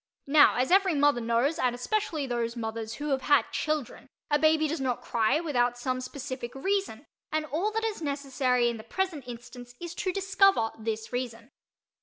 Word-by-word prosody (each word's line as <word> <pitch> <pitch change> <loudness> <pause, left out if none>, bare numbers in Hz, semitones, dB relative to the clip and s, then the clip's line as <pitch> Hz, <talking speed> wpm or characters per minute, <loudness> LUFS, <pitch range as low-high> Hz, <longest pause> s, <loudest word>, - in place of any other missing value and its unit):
Now 290 +1 +6
as 255 +4 0
every 380 -3 +4
mother 285 -3 +3
knows, 235 +8 +1
and 245 -1 +1
especially 315 +2 -1
those 235 -2 -2
mothers 225 -1 -4
who 295 0 -4
have 270 -1 +1
had 290 0 +3
children, 300 -3 -3 0.2
a 295 - +4
baby 315 0 +4
does 315 0 -3
not 255 -2 -1
cry 225 +5 +2
without 245 -7 0
some 255 +1 -2
specific 255 -2 -6
reason 380 - -1 0.3
and 310 0 0
all 325 +8 -1
that 445 +1 -2
is 430 -5 -3
necessary 270 -4 0
in 235 -1 -1
the 220 - -10
present 320 0 -3
instance 245 0 -10
is 345 -1 -6
to 370 +1 -2
discover 390 - +3
this 220 +1 -4
reason. 245 0 -4
270 Hz, 180 wpm, -28 LUFS, 240-315 Hz, 0.3 s, Now